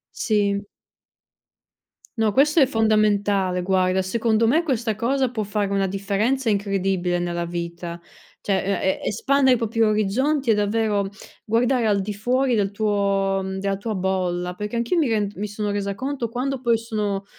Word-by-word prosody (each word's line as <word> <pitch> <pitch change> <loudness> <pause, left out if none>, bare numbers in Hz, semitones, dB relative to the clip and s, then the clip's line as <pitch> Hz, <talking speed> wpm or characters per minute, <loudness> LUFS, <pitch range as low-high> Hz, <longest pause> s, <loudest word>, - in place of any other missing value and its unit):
Sì. 205 -2 0 1.5
No, 220 -2 +2
questo 295 +7 +3
è 275 - +7
fondamentale, 205 -5 +1
guarda, 185 0 +1
secondo 225 +3 +1
me, 320 +8 +3
questa 240 -7 -1
cosa 260 +3 0
può 220 -3 -3
fare 205 0 -1
una 195 -1 +1
differenza 205 +6 0
incredibile 195 -3 0
nella 175 0 -2
vita, 170 0 -5 0.4
cioè 195 - 0 0.3
e 190 - +1
e - - -4
espandere 265 +4 +3
i - - -1
propri 230 0 0
orizzonti 230 +6 +1
ec, 220 - +4
davvero, 210 -1 0 0.4
guardare 235 +2 +1
al 205 -2 +2
di 205 +2 -3
fuori 250 +4 +1
del 200 -1 0
tuo 200 -2 +1 0.2
della 195 0 -1
tua 215 +3 -4
bolla. 180 -2 -1
Perché 210 +4 -5
anch'io 235 +10 0
mi 315 - +3
rend 210 -3 0
mi 205 - -3
sono 210 0 -3
resa 200 -1 -2
conto 260 +1 -3
quando 255 +3 -3
poi 235 -2 +2
sono 210 -3 -3
210 Hz, 160 wpm, -23 LUFS, 195-235 Hz, 1.5 s, è